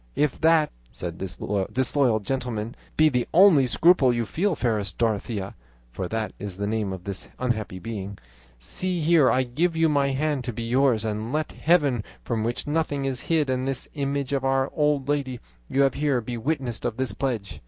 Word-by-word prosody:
'If 150 -3 0
that,' 160 -1 +4 0.2
said 85 +4 -6
this 95 -2 -4 0.3
disloyal 130 -2 +2
gentleman, 120 -1 -3 0.2
'be 155 - +6
the 125 -4 0
only 170 -8 +7
scruple 150 -1 +5
you 120 -1 -1
feel, 180 - 0
fairest 110 -8 -1
Dorothea' 105 -3 -1 0.4
(for 90 +9 -4
that 110 +2 -3
is 100 -2 -6
the 100 - -2
name 105 -2 -1
of 95 -2 -6
this 100 0 -6
unhappy 110 -7 -2
being), 100 -1 -6 0.4
'see 175 - -1
here 155 -3 +5
I 130 - +3
give 160 +8 0
you 160 0 +3
my 140 -2 +2
hand 140 0 -1
to 120 - -3
be 115 - -5
yours, 120 -2 +2
and 110 +2 -3
let 155 +1 -1
Heaven, 145 -9 +2 0.2
from 115 -3 -2
which 120 +2 -2
nothing 145 -2 -1
is 130 -2 -1
hid, 160 -3 +2
and 130 0 -1
this 135 -2 -1
image 140 -2 -2
of 135 -1 0
Our 135 0 +1
Lady 145 -3 0 0.3
you 140 - +3
have 135 -1 +3
here, 145 -3 +1
be 120 +1 -5
witnesses 130 -1 -2
of 120 -1 -2
this 130 -5 -1
pledge. 115 -4 -3
130 Hz, 185 wpm, -25 LUFS, 110-145 Hz, 0.4 s, only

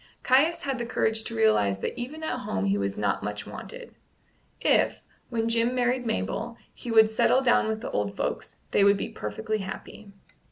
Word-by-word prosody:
Caius 310 +7 +3
had 270 -2 -2
the 235 - -2
courage 220 -2 0
to 230 - -4
realize 215 - +3
that - - -4
even 265 +6 -6
at 255 -5 -2
home 95 - -2
he 100 0 +2
was 100 -1 -2
not 100 -1 0
much 105 0 -4
wanted. - - -9 0.7
If, - - +2 0.3
when 225 -1 -1
Jim 230 +2 +2
married 245 0 +1
Mabel, 230 +1 -2 0.2
he 240 - -9
would 220 -1 +6
settle 255 +4 +3
down 245 -4 +3
with 220 0 -2
the - - -5
old 100 -1 -2
folks, - - -3 0.2
they 200 - +4
would 200 0 +5
be - - -4
perfectly 105 - -4
happy. 195 +1 -8
220 Hz, 190 wpm, -27 LUFS, -, 0.7 s, would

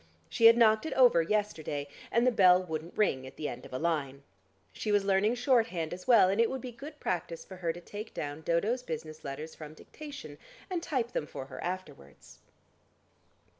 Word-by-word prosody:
She 225 - +6
had 230 +1 +7
knocked 220 +4 +4
it - - -3
over 245 -10 +6
yesterday, 165 -7 -2 0.2
and 235 +1 +3
the 255 - +5
bell 185 -5 +5
wouldn't 160 -1 -6
ring 130 -11 +1
at - - -12
the 150 - -4
end - - -7
of - - -21
a 130 - -3
line. 140 -4 -2 0.5
She 215 - -3
was 205 -1 +3
learning 200 +4 +2
shorthand 230 - +1
as 180 +1 -9
well, 235 -6 +7
and 200 +4 +2
it 230 - +3
would 265 - -3
be 255 -1 -7
good 290 +6 -10
practice 170 -2 -3
for 190 - -10
her 170 -2 -1
to 170 - -9
take 210 +5 -8
down 145 +1 -5
Dodo's 200 +10 0
business 155 -6 -7
letters 150 +3 -6
from 155 0 -10
dictation, 295 - -10 0.3
and 355 -2 -1
type 255 -8 -2
them 150 - -3
for 130 - -7
her 130 -1 -9
afterwards.... 175 - -7
185 Hz, 200 wpm, -30 LUFS, 155-230 Hz, 0.5 s, had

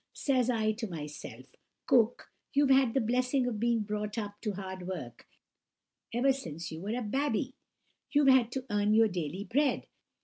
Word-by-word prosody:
Says 255 -3 +1
I 220 -3 +2
to 225 +1 -4
myself, 150 -4 -8 0.4
'Cook, 240 -2 +2 0.2
you've 280 -1 +4
had 265 -3 +4
the - - +4
blessing 250 +3 +1
of 235 -4 -2
being 235 0 +2
brought 210 +1 -3
up 205 -2 -5
to 210 -3 -2
hard 190 -1 -6
work 130 -11 -7 0.8
ever 260 +4 +3
since 165 - -6
you 160 +1 -7
were 210 +5 -2
a 250 - -2
babby. 265 +3 -1 0.6
You've 290 -2 +4
had 255 -3 +5
to 265 -1 -3
earn 205 +1 +2
your 225 0 +6
daily 180 +1 -3
bread. 275 +6 +1
225 Hz, 170 wpm, -31 LUFS, 205-255 Hz, 0.8 s, your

